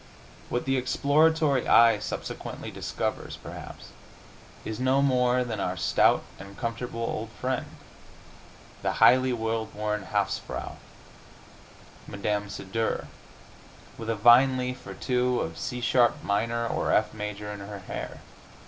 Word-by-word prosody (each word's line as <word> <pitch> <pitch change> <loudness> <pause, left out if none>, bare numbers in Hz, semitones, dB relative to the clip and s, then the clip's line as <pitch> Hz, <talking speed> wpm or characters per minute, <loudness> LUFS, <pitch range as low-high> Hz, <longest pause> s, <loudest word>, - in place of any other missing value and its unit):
What 120 - -1
the 135 0 +1
exploratory 145 +2 +2
eye 115 -2 +6
subsequently - - -6
discovers, - - -4
perhaps, - - -10 0.8
is 110 +1 -4
no 130 +2 +3
more 125 -2 +3
than 115 -4 -4
our 90 -1 -2
stout - - +3 0.2
and 100 +1 -11
comfortable 115 0 -4
old 115 -1 -3
friend, 130 0 -1 1.1
the - - 0
highly 130 +1 +5
well 115 -1 -1
born 105 -1 -3
hausfrau, - - -2 1.3
Mme. 105 0 -2
C 100 - -6
Dur 110 +4 -2 0.9
with 115 0 -5
a 115 - +1
vine 120 +5 +6
leaf 125 0 -4
or - - -7
two 125 -1 +1
of 80 0 -4
C 125 0 -4
sharp 120 0 +3
minor 115 +3 0
or - - -1
F 105 0 +2
major 105 -1 -5
in 105 - -7
her 100 +1 -7
hair. - - -6
115 Hz, 130 wpm, -27 LUFS, 105-125 Hz, 1.3 s, eye